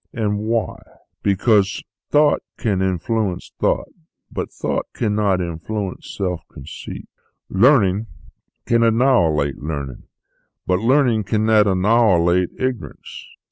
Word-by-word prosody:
And 105 -3 -1
why? 110 0 -1 0.4
Because 100 0 +2 0.3
thought 150 0 +3 0.2
can 100 -4 0
influence 95 +1 -1
thought, - - 0 0.4
but - - -4
thought - - -3
cannot 105 -4 0
influence 90 +4 -5
self 90 -4 -2
conceit; 65 - -9 0.4
learning 105 -2 +3 0.6
can 115 0 +2
annihilate 115 - +2
learning; 70 -4 -5 0.6
but 90 0 +1
learning 120 -2 +2
cannot 110 0 +3
annihilate 95 -3 +3
ignorance. 130 -3 -5
105 Hz, 100 wpm, -20 LUFS, 90-115 Hz, 0.6 s, thought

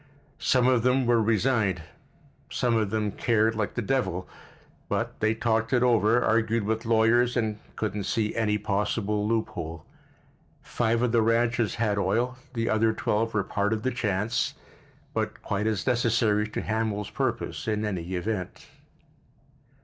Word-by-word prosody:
Some 125 -1 +3
of 125 -2 +4
them 125 +2 +2
were 120 -1 +3
resigned—some 110 - -1
of 110 -3 +1
them 105 0 -1
cared 110 +1 +2
like 110 -2 -2
the 120 - -1
devil, 95 -8 -1 0.6
but - - -2
they'd 110 +1 +1
talked 115 0 +1
it 125 -1 +3
over, 120 -1 +3
argued 110 0 +2
it - - -5
with 110 +2 -1
lawyers 115 +2 +3
and 110 -3 -1 0.2
couldn't 105 -2 -3
see 110 -2 -1
any 105 -2 +1
possible 105 0 -1
loophole. 85 -8 -3 0.8
Five 115 0 0
of 125 - +2
the 115 -1 +3
ranches 115 0 +1
had 105 -3 0
oil, 115 +7 0 0.2
the 115 -1 -1
other 110 +1 +2
twelve 110 +1 -1
were 100 - +2
part 105 +2 0
of 110 0 -3
the 130 - 0
chance, 105 -1 -1 0.6
but - - -2
quite 105 +2 -1
as 110 -4 -1
necessary 115 -4 +2
to - - -3
Hamil's 110 -2 -2
purpose, - - -2
in 110 -1 0
any 95 -3 -3
event. 95 0 -4
110 Hz, 150 wpm, -27 LUFS, 105-115 Hz, 0.8 s, of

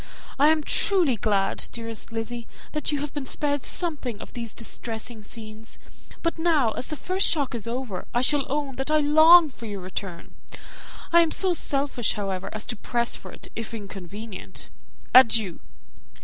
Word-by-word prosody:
I 290 - +6
am 310 0 +3
truly 350 - +3
glad, 200 -2 0
dearest 230 -1 -6
Lizzy, 230 +1 -5 0.2
that 300 -1 -1
you 290 -1 -1
have 295 -1 -5
been 285 -3 -4
spared 285 0 0
something 285 - -2
of - - -10
these 230 -2 -5
distressing 225 0 -4
scenes; 215 0 -8 0.5
but 335 -1 -1
now, 310 -9 +3
as 250 - -1
the 305 - -4
first 370 +5 +1
shock 285 -6 +1
is 230 -1 -4
over, 235 -6 -4 0.2
shall 290 +2 +4
I - - -5
own 280 -1 -2
that 270 +2 -2
I 310 - +4
long 315 +3 +7
for 235 -3 -10
your 200 -2 -5
return? 185 -1 -7 0.8
I 340 - +8
am 335 - +2
not - - 0
so 375 -2 +3
selfish, 275 -7 0
however, 195 -3 -3
as 215 0 -4
to 240 - -3
press 235 +2 -1
for - - -10
it, - - -10
if 230 0 -5
inconvenient. 200 0 -8 0.4
Adieu! 225 -8 +6
240 Hz, 175 wpm, -25 LUFS, 220-295 Hz, 0.8 s, I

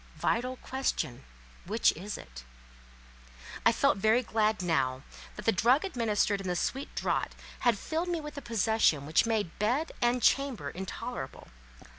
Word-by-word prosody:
Vital 255 +2 0
question—which 135 - -2
is 195 +5 -6
it? - - -11 1.2
I - - +6
felt - - +2
very 220 +5 +3
glad 215 -3 +1
now, 135 -6 0 0.3
that - - -8
the 225 - +5
drug 245 - +3
administered 215 - 0
in 190 - -6
the 180 - 0
sweet 270 +10 -2
draught - - -1 0.2
had 240 -4 +3
filled 325 - -2
me 345 -1 0
with 300 -1 -8
a 285 - -5
possession 220 - +2
which 160 +9 +3
made 215 -7 -1
bed 250 +10 +1
and 240 +1 +3
chamber 260 - +2
intolerable. 190 +1 -6
220 Hz, 145 wpm, -30 LUFS, 175-250 Hz, 1.2 s, I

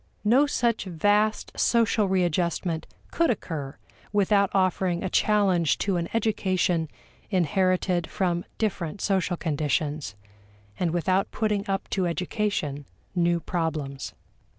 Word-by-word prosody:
No 250 +7 +4
such 235 -6 0
vast 205 +5 +1
social 225 -3 +3
readjustment 175 -2 0 0.2
could 335 -2 +2
occur 155 - -3 0.3
without 200 -1 +3
offering 185 -2 +1
a 190 - -2
challenge 190 -7 +3
to 195 -3 0
an 170 0 -2
education 185 -7 0 0.4
inherited 185 -1 +1
from 175 -2 0
different 200 -5 -2
social 190 -3 0
conditions, 150 - -1 0.6
and 175 - +1
without 185 +3 +1
putting 210 -2 -1
up 195 0 -1
to 185 -3 +1
education 170 -5 -2 0.3
new 175 -1 +2
problems. 155 -5 -3
185 Hz, 110 wpm, -26 LUFS, 165-205 Hz, 0.6 s, No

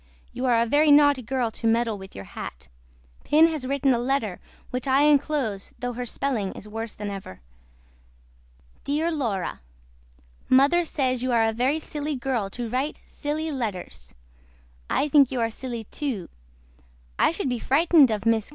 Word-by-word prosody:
YOU 255 - -3
ARE 235 -2 +4
A - - -1
VERY 295 +6 +3
NAUGHTY 290 -2 +6
GIRL 245 -1 -1
TO 225 - -3
MEDDLE 230 -1 +2
WITH 190 -1 -11
YOUR 95 - -8
HAT. 65 -6 -9 0.5
PIN 310 +2 +5
HAS 310 -6 -1
WRITTEN 275 0 +2
A 235 - 0
LETTER 240 -7 -1 0.3
WHICH 250 +2 -3
I 270 +2 +4
ENCLOSE 285 -8 +1
THOUGH 245 0 -4
HER 250 +1 -4
SPELLING 230 -7 -2
IS 210 - -10
WORSE 225 +1 -5
THAN 205 -1 -5
EVER. 190 - -8 1.4
DEAR 310 +4 0
LAURA 230 - -2 0.9
MOTHER 285 +7 +5
SAYS 255 -5 0
YOU 255 0 -1
ARE 230 -2 +3
A 225 - 0
VERY 260 +7 +1
SILY 300 -1 -4
GIRL 245 -6 -2
TO 240 +3 -5
RITE 260 +6 -1
SUCH - - -26
SILY 310 +2 -3
LETTERS 185 - -5 0.7
I 295 - +1
THINK 280 -3 +5
YOU 260 - -2
ARE 230 -1 0
SILY 240 -1 -6
TO 255 - -4 0.9
I - - +5
SHOOD 330 -4 -2
BE 245 -1 -2
FRITENED 295 +2 +4
OF 215 -2 -1
MRS. 225 -2 +1
255 Hz, 170 wpm, -25 LUFS, 225-290 Hz, 1.4 s, NAUGHTY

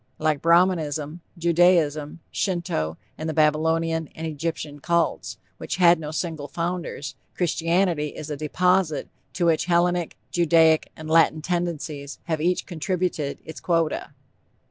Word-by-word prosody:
Like 155 -2 0
Brahmanism, 165 -2 +2 0.2
Judaism, 165 -3 +2
Shinto 155 - -1 0.2
and 160 +1 -3
the 155 - -3
Babylonian 160 +1 +2
and 160 - -5
Egyptian 155 -1 -4
Cults, 170 +3 0 0.2
which - - -3
had 175 -2 +5
no 150 -2 -5
single 155 -2 -3
founders, 170 -3 -4 0.2
Christianity 170 -1 +1
is 155 0 -7
a - - -2
deposit 180 +2 +1 0.2
to 175 - 0
which 165 -2 +2
Hellenic, 175 -1 +1
Judaic 165 -2 +4
and 155 - -8
Latin 160 -1 +4
tendencies 160 -5 -3
have 160 -2 -2
each 180 +2 +1
contributed 175 -4 -2
its 160 - -8
quota. 165 -3 0
165 Hz, 125 wpm, -24 LUFS, 155-175 Hz, 0.2 s, had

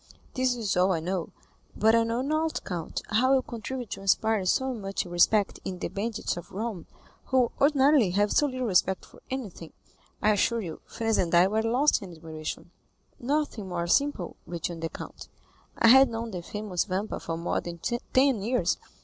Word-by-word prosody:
This 255 -1 +1
is 220 -5 -1
all 185 +1 +3
I 165 - 0
know, 175 +1 -3 0.5
but 220 +1 +4
I 230 0 +5
know 230 +2 -1
not, 310 +3 -1
count, 170 -4 -4
how 255 +5 +4
you 260 - +2
contrived 240 +1 -6
to - - -5
inspire 200 0 +2
so 260 +6 +1
much 195 -5 -3
respect 180 +4 +2
in 185 -1 -4
the - - -4
bandits 205 +1 -3
of 175 - -9
Rome 210 -3 -4 0.4
who 255 -2 +2
ordinarily 280 -5 +5
have 205 +3 +1
so 295 - +3
little 255 -2 -3
respect 190 -2 +2
for - - -18
anything. 210 -11 -6 0.5
I 215 - +3
assure 230 +3 +1
you, 165 -6 -7
Franz 225 -1 0
and 175 -1 +1
I 175 +1 +7
were 215 +3 +1
lost 250 +7 +2
in 185 -3 -9
admiration." 160 +1 -7 0.5
"Nothing 255 -6 -2
more 170 -1 -2
simple," 225 -1 0
returned 170 -1 -4
the 165 - -2
count. - - -9 0.5
"I 230 - +5
had 265 +1 +8
known 230 0 -4
the 180 -3 -5
famous 205 0 -3
Vampa 200 +2 -3
for 165 0 -4
more 170 - -1
than 170 -1 -7
ten 240 +4 +1
years. 245 +5 0
215 Hz, 185 wpm, -27 LUFS, 180-250 Hz, 0.5 s, had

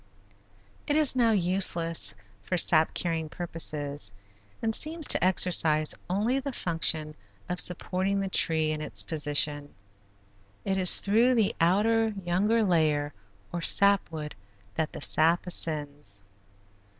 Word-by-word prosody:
It 290 - 0
is 305 -4 +3
now 240 -2 +2
useless 170 - +2 0.3
for 180 - -4
sap 160 -2 +2
carrying 165 -3 -3
purposes 150 - -2 0.5
and 225 -1 -2
seems 315 +5 0
to - - +3
exercise 165 -4 +3 0.2
only 215 +8 -1
the 275 +1 -6
function 160 -5 -2 0.3
of 180 0 -4
supporting 185 +2 -1
the 195 - -3
tree 160 -4 +2
in 155 0 -5
its - - -4
position. 145 -1 -1 0.9
It 195 -1 -2
is 180 -1 +5
through 230 +5 +2
the 220 -4 0
outer, 215 +5 +1
younger 210 +6 0
layer 155 -6 0 0.4
or 175 - -4
sap 200 +1 +3
wood 150 -2 -7 0.4
that 155 +7 -3
the - - -9
sap 165 +4 +3
ascends. 145 - -2
175 Hz, 125 wpm, -26 LUFS, 155-200 Hz, 0.9 s, is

